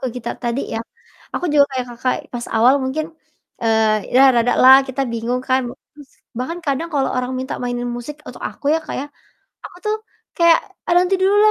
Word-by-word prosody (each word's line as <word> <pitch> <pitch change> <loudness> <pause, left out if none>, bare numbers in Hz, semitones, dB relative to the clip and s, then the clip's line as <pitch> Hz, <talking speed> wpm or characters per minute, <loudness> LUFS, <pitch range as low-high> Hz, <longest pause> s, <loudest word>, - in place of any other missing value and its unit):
ke - - 0
gitar 235 -1 -4
tadi 240 +3 -1
ya, 225 - -2 0.5
aku - - -2
juga 285 -1 +6
kayak 255 -1 -2
Kakak 255 +2 -1 0.2
pas 240 - -4
awal 245 +5 +5
mungkin, 295 +4 -2 0.6
eee, 220 -1 +1
ya 265 - +7
rada 235 +1 +3
lah 260 +1 +10
kita 270 +1 -2
bingung 235 +2 -2
kan, 260 +1 +3 0.3
terus 290 -3 -16 0.3
bahkan 330 +8 -3
kadang 280 +4 -1
kalau 275 -2 +1
orang 255 0 -2
minta 260 - -4
mainin 245 0 -2
musik 285 +5 -7
untuk - - -10
aku, - - -17
ya - - +2
Kak, - - -5
ya. 285 - -5 0.6
Aku - - -12
tuh 425 0 +1 0.4
kayak, 335 -1 +6 0.3
"Ah, - - +3
nanti 365 +2 +3
dulu 385 +1 +3
lah 415 - +5
260 Hz, 200 wpm, -19 LUFS, 240-295 Hz, 0.6 s, lah